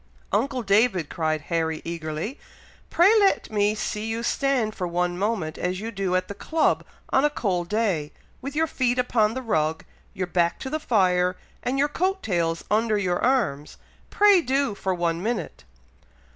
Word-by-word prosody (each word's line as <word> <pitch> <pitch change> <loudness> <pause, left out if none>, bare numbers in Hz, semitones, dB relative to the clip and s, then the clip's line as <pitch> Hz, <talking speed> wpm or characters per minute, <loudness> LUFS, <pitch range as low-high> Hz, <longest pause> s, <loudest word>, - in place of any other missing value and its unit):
"Uncle 260 +1 0
David!" 200 -5 +2
cried 155 -2 -1
Harry, 160 +1 -1
eagerly, 165 - -4 0.5
"pray 370 +5 +5
let 395 - +2
me 210 0 +2
see 215 0 -3
you 225 +1 -3
stand 250 -4 0
for 185 -4 -3
one 175 +1 -1
moment 190 -5 -2
as 180 +1 -2
you 225 +2 -5
do 195 -3 -1
at 185 - 0
the - - -5
club 320 +10 0 0.3
on 265 - +3
a 295 - +4
cold 185 -11 -2
day, 195 -9 0 0.3
with 275 +2 -6
your 320 +1 +3
feet 255 -5 0
upon 230 -3 +2
the 260 - -4
rug, 160 -8 0 0.3
your 185 - -1
back 175 -1 +1
to 265 - -6
the 310 - -1
fire, 180 -8 +2 0.3
and 255 +2 -1
your 285 +2 +3
coat 375 +6 -1
tails 165 -4 -1
under 215 0 +2
your 180 -3 0
arms! 195 - 0 0.3
Pray 405 -3 +5
do, 270 -4 0
for 195 -1 -3
one 170 -2 -1
minute!" 215 - -3
210 Hz, 170 wpm, -25 LUFS, 175-255 Hz, 0.5 s, pray